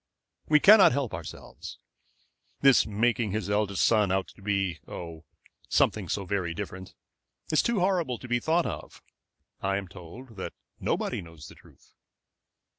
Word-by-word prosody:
"We 150 0 +6
cannot 200 - +8
help 135 -4 -2
ourselves. - - -8 0.8
This 135 -3 +5
making 110 0 0
his 110 -1 -2
eldest 105 -1 +1
son 105 -4 +3
out 95 -2 0
to - - -17
be 95 -4 -1
oh, 85 -2 -8 0.4
something - - +1
so 100 - -2
very 90 -3 -2
different 95 0 -7 0.6
is 155 - +4
too 235 -5 0
horrible 175 -9 +1
to 130 - -10
be 120 0 +1
thought 165 +5 +1
of. - - -7 0.6
I 95 0 0
am 100 -1 -5
told 100 +7 -12
that 95 - -5 0.3
nobody - - -1
knows 80 -3 -12
the - - -13
truth." - - -22
105 Hz, 150 wpm, -28 LUFS, 95-130 Hz, 0.8 s, cannot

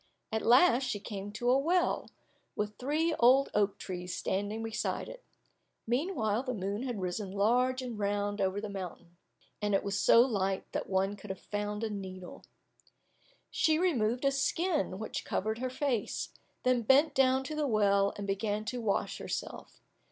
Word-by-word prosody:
At 220 0 0
last 255 +2 +5
she 210 - -2
came 205 -1 -6
to 240 +3 +1
a 265 - +4
well, 345 +5 +1 0.5
with 210 0 -2
three 310 +5 +1
old 260 +3 +5
oak 205 -1 +1
trees 180 -1 -5
standing 205 +3 -2
beside 225 -1 -2
it; - - -10 0.6
meanwhile 240 - 0
the 255 -2 -3
moon 200 +2 -3
had 245 -5 -3
risen 185 +2 -3
large 250 +6 +2
and 240 -4 -5
round 205 0 -1
over 190 +1 0
the 215 - -4
mountain, 180 -3 -8 0.4
and 205 -1 +1
it - - +1
was 200 0 -1
so 230 - +7
light 195 -6 0
that - - -3
one 195 +1 +1
could 205 0 -12
have 190 - -4
found 210 +1 -4
a 225 - -1
needle. 185 -3 -7 1.1
She 315 -1 +3
removed 255 -8 +1
a 275 - +4
skin 290 - 0
which 220 +2 -4
covered 220 +3 -2
her 255 +1 -2
face, 255 -4 -2 0.3
then 255 -1 +3
bent 270 +7 +4
down 265 0 +3
to 305 +3 -5
the 300 -1 0
well, 200 -3 +3
and 200 - -5
began 205 +2 -1
to 245 +2 -3
wash 210 -3 -1
herself. - - -6
220 Hz, 170 wpm, -31 LUFS, 200-255 Hz, 1.1 s, so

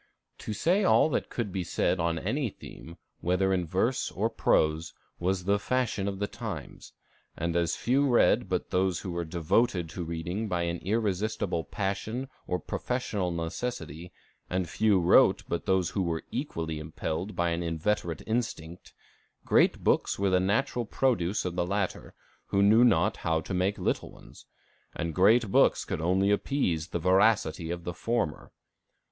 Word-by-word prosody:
"To - - -6
say 175 - +2
all 180 - +5
that - - -1
could 115 -5 -3
be 95 0 -2
said 90 - 0
on 85 0 0
any 130 - -1
theme, 85 -3 -12 0.2
whether 90 +2 +1
in 90 -2 -1
verse - - 0
or - - -1
prose, 80 +2 +1 0.2
was 90 +1 0
the 100 +2 +2
fashion 115 -4 -1
of 100 -1 -3
the 100 - -1
times; - - -7 0.4
and 85 +1 -2
as 85 -1 +1
few 135 +4 +2
read 120 - +3
but - - -2
those 90 -2 +1
who 95 - -5
were 85 0 -3
devoted 85 +2 0
to 90 - -5
reading 85 +6 -3
by 90 -3 -1
an 85 0 -2
irresistible 105 -2 -1
passion 105 - -3 0.2
or 90 - 0
professional 105 0 -2
necessity, 85 - -5 0.4
and 90 -1 -1
few 100 +2 +2
wrote 85 - +5
but 85 - -3
those 95 -3 +2
who 100 - -1
were 85 -3 -2
equally 80 - -3
impelled 80 +5 -4
by 85 0 +1
an 85 +1 -1
inveterate 85 0 -2
instinct, 100 -8 -4 0.5
great - - +3
books - - +2
were 100 -1 +1
the 90 - +4
natural 115 +6 0
produce 110 -9 0
of 90 -1 -3
the 90 - +1
latter, 100 +1 -3 0.3
who 100 0 +2
knew 110 +4 +6
not 110 -3 +3
how 80 -1 0
to 90 - -6
make 95 +3 0
little - - -2
ones; - - -16 0.5
and 85 0 -3
great 105 +4 +4
books - - +4
only 90 +5 +1
could - - +5
appease 90 - 0
the 85 - -3
voracity 90 -2 +2
of 85 0 -4
the 90 - -4
former. 115 -3 -2
95 Hz, 165 wpm, -28 LUFS, 85-105 Hz, 0.5 s, knew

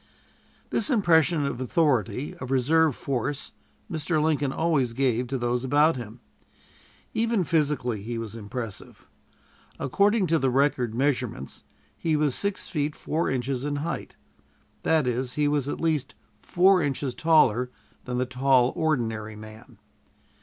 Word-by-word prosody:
This - - +1
impression 170 - +3
of 130 -2 -3
authority, 130 - 0
of 125 - -7
reserve 145 +3 +3
force, 140 +1 -3 0.4
Mr. 155 0 -1
Lincoln 150 -3 +1
always 145 -7 +1
gave 125 -1 0
to 135 +2 -2
those 120 0 -1
about 145 +5 +3
him. 120 -1 -8 0.9
Even 225 -3 +1
physically 145 - 0
he 115 +3 -4
was 115 -1 -5
impressive. 110 -1 -7 0.7
According 200 - +2
to 165 -1 +2
the 135 - +1
record 125 -3 +1
measurements, 125 - -2 0.3
he 160 -2 0
was 150 -3 +1
six 200 +6 -2
feet 150 -3 -2
four 160 +2 -2
inches 130 0 -2
in 145 0 -2
height. 170 - -5 0.7
That 160 -3 +2
is, 125 +1 -1
he 150 -1 +1
was 145 -1 0
at - - -4
least 155 -5 -1 0.3
four 185 +1 +4
inches 140 -2 -2
taller 125 -5 +3 0.4
than 125 -1 -3
the 125 - +1
tall, 130 0 +3
ordinary 115 -9 -1
man. 110 +2 -12
135 Hz, 140 wpm, -26 LUFS, 125-155 Hz, 0.9 s, four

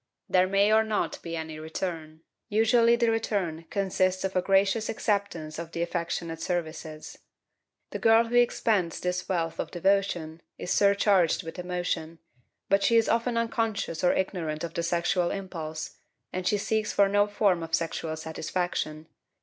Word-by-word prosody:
There 185 0 +3
may 200 +2 +3
or 220 0 +5
not 220 -1 -2
be 165 -1 -5
any 160 -1 -6
return; 160 -1 -5 0.3
usually 230 +2 +4
the 235 -1 +2
return 190 -8 -2
consists 185 -2 0
of 190 0 -2
a 185 - +3
gracious 195 +3 +2
acceptance 200 -8 -2
of 170 -1 -7
the 170 - -1
affectionate 170 -1 -3
services. 160 -3 -4 0.7
The - - -4
girl 225 0 +5
who 235 +1 -4
expends 220 -7 +2
this 180 +1 -2
wealth 165 -3 -1
of - - -2
devotion 175 -3 0 0.2
is 180 - -5
surcharged 200 -3 +3
with 165 +2 -8
emotion, 175 -2 -3 0.5
but 195 0 +3
she 230 - +3
is 225 - +3
often 230 +1 +1
unconscious 225 -7 -1
or 180 - +5
ignorant 165 -5 -2
of 165 -1 -4
the 170 - -1
sexual 175 +1 +1
impulse, 160 -5 -5 0.4
and 185 0 -2
she 210 - +3
seeks 215 +1 -1
for 200 - +4
no 205 +1 +3
form 205 -4 +2
of 165 0 0
sexual 165 -1 -3
satisfaction. 160 -1 -3
185 Hz, 160 wpm, -27 LUFS, 165-205 Hz, 0.7 s, or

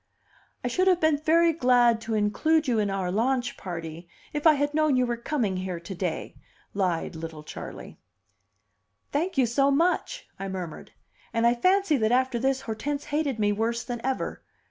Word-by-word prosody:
"I - - 0
should 365 +10 +1
have 365 -2 +4
been 315 -3 +3
very 330 +2 +4
glad 245 -5 +4
to 225 -1 -2
include 300 +10 +2
you 235 -3 +2
in 205 -1 +1
our 190 -2 -2
launch 245 +4 0
party 170 -1 -7 0.2
if 295 +2 +2
I 315 - +8
had 290 +1 0
known 310 -2 +3
you 255 - +3
were 240 -1 -1
coming 235 -5 -1
here 185 -2 -4
to 170 +3 -8
day," 175 -3 -4 0.4
lied 180 -4 -1
little 160 -1 -7
Charley. - - -9 1.1
"Thank 325 +3 -1
you 260 - +5
so 275 +4 +2
much!" 350 - 0
I 195 - -4
murmured; 185 -4 -6 0.4
and 230 0 +1
I 235 - +5
fancy 365 +4 +3
that 220 -2 +1
after 255 -1 +2
this 265 +2 +1
Hortense 270 +5 -3
hated 290 -4 -1
me 205 -1 +2
worse 225 +3 -1
than 240 -2 -5
ever. 265 0 -2
245 Hz, 180 wpm, -26 LUFS, 200-290 Hz, 1.1 s, I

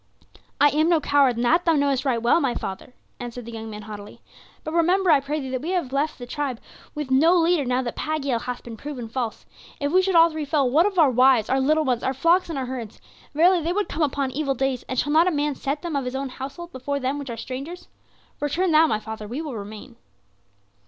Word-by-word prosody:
"I 290 - +6
am 310 +3 +2
no 335 -2 +4
coward, 280 -4 +3
and 240 +1 -1
that 335 +8 +3
thou 330 - +3
knowest 280 -2 +1
right 250 -4 +1
well, 240 +8 +3
my 265 -4 0
father," 195 +6 -6 0.2
answered 245 -1 -7
the 235 - -8
young 225 -1 -7
man 210 -1 -8
haughtily; 205 -1 -10 0.4
"but 310 - -5
remember, 355 +2 +3
I 295 - +6
pray 290 +3 -3
thee, 265 -2 -5
that 255 -1 -2
we 320 - -4
have 335 -8 -2
left 290 +3 0
the 245 - -8
tribe 265 -2 -3 0.4
with 295 -3 -4
no 320 +7 +5
leader 335 -3 +2
now 250 +1 0
that 240 - -5
Pagiel 280 -6 -1
hath 250 0 -5
been 235 -1 -8
proven 260 -3 -6
false. 230 -1 -4 0.3
If 285 0 -1
we 370 +2 +5
should 375 -1 0
all 330 0 +7
three 310 -1 -4
fall, 285 -3 +1
what 325 +8 +4
of 395 -2 -4
our 305 -6 +5
wives, 250 -2 +4
our 265 - +3
little 305 +3 +2
ones, 250 -3 0
our 265 - -1
flocks 340 +6 +3
and 320 - -4
our 265 - -2
herds? 245 -4 -7 0.4
Verily 350 +3 +4
they 335 +3 -1
would 415 +1 -1
come 330 - -4
upon 280 -2 0
evil 275 0 -1
days, 265 -1 -1
and 260 - -3
shall 290 +4 0
not 330 +3 +5
a - - +3
man 295 -1 0
set 280 +2 -4
them 340 -3 -3
of 275 -2 -1
his 250 +1 -4
own 270 0 -3
household 280 +7 -8
before 280 +2 -3
them 270 +2 -2
which 280 -2 -7
are 235 - -5
strangers? 275 +10 -7 0.5
Return 330 +5 0
thou, 315 +1 +6
my 215 -7 0
father, 215 -1 -7
we 245 +7 -5
will 305 -6 -5
remain." 215 +4 -9
275 Hz, 245 wpm, -24 LUFS, 250-315 Hz, 0.5 s, all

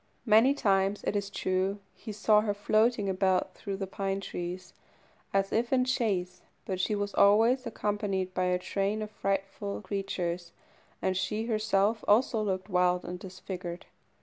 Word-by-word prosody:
Many 230 +5 +5
times, 195 -4 +1
it - - -1
is 200 -1 -1
true, 190 0 -1 0.2
he 220 - -8
saw 210 0 +4
her 205 -1 -1
floating 215 +1 +2
about 190 -1 +1
through 200 -2 -5
the 195 - -3
pine 195 0 -2
trees, 180 -1 -6 0.6
as 195 0 +1
if 235 +2 +1
in 255 -1 +3
chase, 190 -8 -1 0.2
but 185 -2 -3
she 210 +3 +1
was 205 0 -2
always 230 +5 +4
accompanied 205 -4 -2
by 185 0 0
a 180 0 +2
train 200 +3 -1
of 210 - -7
frightful 195 0 -2
creatures, 180 -3 -3 0.5
and 190 0 +1
she 210 +4 -1
herself 215 -1 +1
also 225 +1 +3
looked 190 -2 -2
wild 180 -2 +2
and 180 +1 -5
disfigured. 180 -1 -7
195 Hz, 155 wpm, -29 LUFS, 185-215 Hz, 0.6 s, Many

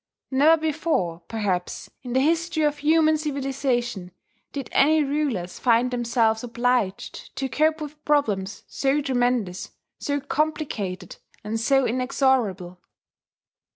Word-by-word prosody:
Never 305 +5 +5
before, 305 - -1
perhaps, 195 -5 -2
in 245 -2 -6
the 260 - +3
history 330 +2 +1
of 295 -1 +1
human 310 +1 +4
civilization, 265 - -2 0.4
did 275 -3 -5
any 310 +2 +4
rulers 275 -11 -2
find 245 +1 +3
themselves 230 -2 +1
obliged 240 -4 -2
to 270 - -2
cope 310 +3 +1
with 300 0 -8
problems 210 -10 0
so 275 +1 0
tremendous, 245 -8 0 0.3
so 285 0 -1
complicated, 280 - -3 0.3
and 220 +2 -2
so 270 +3 +3
inexorable. 245 -8 0
265 Hz, 115 wpm, -24 LUFS, 225-295 Hz, 0.4 s, Never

